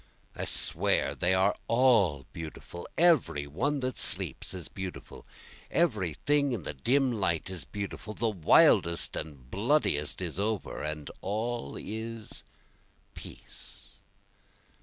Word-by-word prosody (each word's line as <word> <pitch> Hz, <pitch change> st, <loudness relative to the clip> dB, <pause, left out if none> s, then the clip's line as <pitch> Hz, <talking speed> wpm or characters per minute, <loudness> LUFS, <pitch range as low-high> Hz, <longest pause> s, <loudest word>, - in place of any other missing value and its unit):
I -, -, -3 dB
swear -, -, +1 dB
they 90 Hz, +2 st, +2 dB
are 95 Hz, +2 st, +3 dB
all 110 Hz, -, +4 dB
beautiful, 80 Hz, +2 st, -8 dB
Every 155 Hz, -, +4 dB
one 130 Hz, -, -1 dB
that 130 Hz, 0 st, -2 dB
sleeps -, -, +2 dB
is 90 Hz, -4 st, -6 dB
beautiful, 95 Hz, -1 st, -8 dB, 0.4 s
every 105 Hz, -, +1 dB
thing 145 Hz, -2 st, +3 dB
in 105 Hz, -8 st, -3 dB
the 75 Hz, -, -4 dB
dim 130 Hz, -, +2 dB
light 95 Hz, -5 st, 0 dB
is 95 Hz, -, -7 dB
beautiful, 105 Hz, +1 st, -6 dB
The 115 Hz, -, +1 dB
wildest 85 Hz, -2 st, +4 dB
and 70 Hz, -5 st, -7 dB
bloodiest 100 Hz, -, +1 dB
is 90 Hz, -1 st, -3 dB
over, 105 Hz, 0 st, -2 dB
and 75 Hz, -1 st, -4 dB
all 110 Hz, -5 st, -3 dB
is 110 Hz, +1 st, -6 dB, 0.7 s
peace. -, -, -9 dB
100 Hz, 120 wpm, -29 LUFS, 80-120 Hz, 0.7 s, all